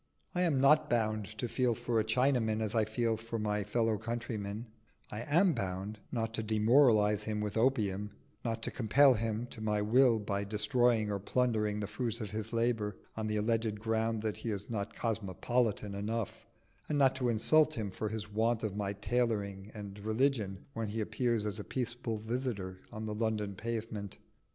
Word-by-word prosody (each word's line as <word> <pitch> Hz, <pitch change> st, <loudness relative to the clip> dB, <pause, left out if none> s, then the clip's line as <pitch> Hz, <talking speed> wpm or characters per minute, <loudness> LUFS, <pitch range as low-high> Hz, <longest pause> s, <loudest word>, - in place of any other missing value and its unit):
I 180 Hz, -, 0 dB
am 160 Hz, -7 st, +3 dB
not 145 Hz, +3 st, +5 dB
bound 110 Hz, -3 st, +1 dB
to 120 Hz, -, -2 dB
feel 125 Hz, -1 st, +1 dB
for 115 Hz, +1 st, 0 dB
a -, -, +2 dB
Chinaman 115 Hz, -1 st, +2 dB
as 110 Hz, -1 st, -2 dB
I 110 Hz, -2 st, +3 dB
feel 110 Hz, +1 st, 0 dB
for 115 Hz, +1 st, -5 dB
my 105 Hz, -1 st, 0 dB
fellow 110 Hz, 0 st, +1 dB
countryman: 110 Hz, -2 st, -4 dB, 0.5 s
I 105 Hz, -, -4 dB
am 170 Hz, +8 st, +3 dB
bound 95 Hz, +1 st, -3 dB
not 115 Hz, -2 st, -2 dB
to 110 Hz, -, -1 dB
demoralise 110 Hz, -1 st, +4 dB
him 110 Hz, -1 st, -2 dB
with 105 Hz, -1 st, -3 dB
opium, 105 Hz, -5 st, +1 dB, 0.3 s
not 115 Hz, -1 st, -2 dB
to -, -, -1 dB
compel 130 Hz, +4 st, +5 dB
him 115 Hz, 0 st, -1 dB
to 110 Hz, -, -8 dB
my 105 Hz, -1 st, +1 dB
will 120 Hz, +3 st, +4 dB
by 100 Hz, -1 st, -2 dB
destroying 110 Hz, +1 st, +2 dB
or 100 Hz, -, -1 dB
plundering 105 Hz, -1 st, 0 dB
the -, -, -1 dB
fruits 115 Hz, +1 st, -2 dB
of 105 Hz, -4 st, -5 dB
his 110 Hz, 0 st, -4 dB
labour 115 Hz, -3 st, 0 dB, 0.2 s
on 110 Hz, -1 st, -2 dB
the 105 Hz, 0 st, 0 dB
alleged 110 Hz, 0 st, 0 dB
ground 110 Hz, 0 st, 0 dB
that 110 Hz, -2 st, -1 dB
he 115 Hz, -, -4 dB
is 105 Hz, +1 st, -3 dB
not 105 Hz, -1 st, -3 dB
cosmopolitan 110 Hz, 0 st, -1 dB
enough, 105 Hz, +1 st, -3 dB, 0.4 s
and 150 Hz, -, +1 dB
not 135 Hz, -2 st, +4 dB
to 125 Hz, -2 st, +1 dB
insult 155 Hz, +8 st, +4 dB
him 105 Hz, -3 st, -3 dB
for 110 Hz, +3 st, -3 dB
his 110 Hz, -1 st, -4 dB
want 110 Hz, +2 st, 0 dB
of 105 Hz, -2 st, -2 dB
my 100 Hz, -1 st, -1 dB
tailoring 100 Hz, -2 st, -1 dB
and 100 Hz, -1 st, -7 dB
religion 110 Hz, -2 st, 0 dB
when 115 Hz, -1 st, -2 dB
he 110 Hz, +2 st, -3 dB
appears 115 Hz, 0 st, 0 dB
as 105 Hz, 0 st, -2 dB
a -, -, -4 dB
peaceable 120 Hz, -2 st, -3 dB
visitor 110 Hz, -5 st, -3 dB
on 110 Hz, -1 st, -5 dB
the 105 Hz, -, -3 dB
London 105 Hz, -2 st, -1 dB
pavement. 110 Hz, -1 st, -4 dB
110 Hz, 185 wpm, -32 LUFS, 105-120 Hz, 0.5 s, not